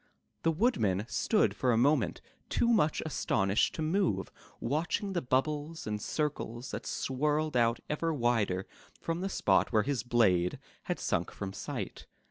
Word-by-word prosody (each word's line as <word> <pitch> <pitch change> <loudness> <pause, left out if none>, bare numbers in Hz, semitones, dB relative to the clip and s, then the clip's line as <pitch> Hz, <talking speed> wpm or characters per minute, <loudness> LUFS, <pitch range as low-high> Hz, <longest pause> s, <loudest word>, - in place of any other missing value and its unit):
The 165 - +2
Woodman 115 - +1
stood 210 - +2
for 125 - +1
a 115 - +3
moment 135 -1 +2 0.3
too 235 - +2
much 160 -10 +3
aston 100 -9 0
ished 100 - +2
to 160 - -3
move, 155 - 0 0.3
watching 175 +6 -1
the 175 - 0
bubbles 150 +5 -1
and 105 -1 -3
circles 130 -5 -3
that - - -5
swirled 150 +3 0
out 115 -1 +3
ever 165 +2 -1
wider 115 - +1 0.3
from 165 +1 -3
the 195 - -1
spot - - +2
where 110 -3 +3
his 140 -2 -1
blade 100 -7 +2 0.3
had - - -1
sunk - - 0
from 95 -1 -6
sight. - - -6
135 Hz, 155 wpm, -31 LUFS, 110-160 Hz, 0.3 s, a